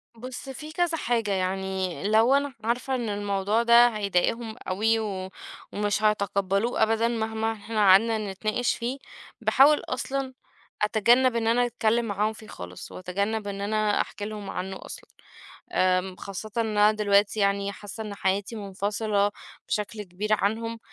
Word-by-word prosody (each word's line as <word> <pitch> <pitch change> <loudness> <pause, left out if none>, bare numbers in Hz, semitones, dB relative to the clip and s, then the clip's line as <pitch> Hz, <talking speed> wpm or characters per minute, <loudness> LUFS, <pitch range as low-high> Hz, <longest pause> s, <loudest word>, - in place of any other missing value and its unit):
بُص، 255 +3 -8
فيه 300 +4 -8
كذا 345 -1 +1
حاجة، 230 -6 0
يعني 190 -1 -2
لو 220 +4 +4
أنا 280 -1 0
عارفة 245 +4 -1
إن 235 -4 -2
الموضوع 205 +2 0
ده 235 +1 +7
هيضايقهم 220 +1 -1
أوي 220 +4 +2
و 190 -3 -4 0.4
ومش 205 +1 -1
هيتقبلوه 200 +1 +1
أبدًا 225 +1 +2
مهما 220 -1 -1
إحنا 220 +1 -7
قعدنا 220 +4 +6
نتناقش 215 +5 -1
فيه، 250 +3 -3 0.4
باحاول 290 +3 +5
أصلًا 265 +1 -3 0.5
أتجنب 235 +4 +4
إن 225 -1 0
أنا 245 +2 +3
أتكلم 235 0 +1
معاهم 210 +1 0
فيه 215 0 -13
خالص، 90 0 -9
وأتجنب 200 +4 -2
إن 200 0 -4
أنا 215 0 +1
أحكِ - - -8
لهم 210 -1 -5
عنه 190 +1 -5
أصلًا. - - -9 0.6
آآ، 185 0 +2
خاصةً 200 +2 -7
أنا 215 -2 +3
دلوقتي 205 0 +2
يعني 200 0 +1
حاسة 205 +2 -8
إن 210 -2 -6
حياتي 200 +3 -1
منفصلة 205 +1 -1 0.4
بشكل 210 +1 -2
كبير 200 +3 -4
عنهم، 225 +3 0
215 Hz, 145 wpm, -26 LUFS, 200-230 Hz, 0.6 s, ده